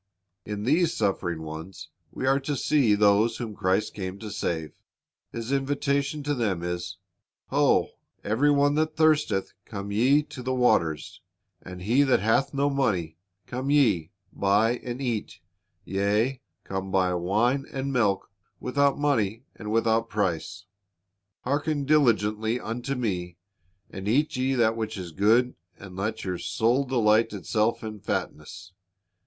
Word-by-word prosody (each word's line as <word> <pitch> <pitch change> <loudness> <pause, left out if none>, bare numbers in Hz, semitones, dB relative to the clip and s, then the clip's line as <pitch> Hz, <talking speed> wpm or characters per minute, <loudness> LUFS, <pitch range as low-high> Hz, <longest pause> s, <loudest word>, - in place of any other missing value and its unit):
In 105 0 -4
these 160 +7 +2
suffering 85 -6 -1
ones 80 +4 -8 0.2
we - - -4
are 135 +1 +3
to 140 +1 -3
see 130 -5 +3
those 105 +2 +3
whom 115 -3 -5
Christ 95 0 0
came 95 -1 -5
to 105 0 -8
save. 80 -7 -3 0.6
His 115 +2 -5
invitation 140 +1 0
to 145 +1 0
them 105 -10 -1
is, 90 +1 -4 0.5
"Ho, - - +3 0.3
every 120 +8 +2
one 145 0 +3
that 155 +1 0
thirsteth, 155 -10 +2
come 100 -1 -6
ye 130 +8 +4
to 145 -3 -10
the 130 +1 -2
waters, 80 -11 +1 0.4
and 90 -1 -9
he 120 +8 +3
that 135 -3 +4
hath 115 +6 +2
no 140 0 +1
money; 95 - -1 0.3
come 130 +2 -4
ye, 110 - +3 0.2
buy 105 +5 +2
and 120 +1 -6
eat; 115 -8 -3 0.5
yea, 105 +7 0 0.2
come, 95 0 -4
buy 95 -1 +2
wine 110 +10 +1
and 135 0 -3
milk 105 -6 +1 0.3
without 140 +1 +1
money 115 -6 0
and 105 -1 -6
without 115 0 +2
price.... 100 -1 -2 0.8
Hearken 145 +2 -1
diligently 115 -5 +2
unto 120 +5 -4
Me, 90 -8 -3 0.5
and 95 +1 -6
eat 140 +8 +2
ye 130 +1 0
that 115 -2 +3
which 110 -1 -4
is 90 -3 -6
good, 115 +8 +3 0.2
and 95 -2 -11
let 110 +3 -3
your 90 -2 -3
soul 120 +5 +1
delight 115 -4 +2
itself 110 +3 0
in 110 -1 -6
fatness. 95 -1 -5
110 Hz, 145 wpm, -26 LUFS, 100-135 Hz, 0.8 s, ye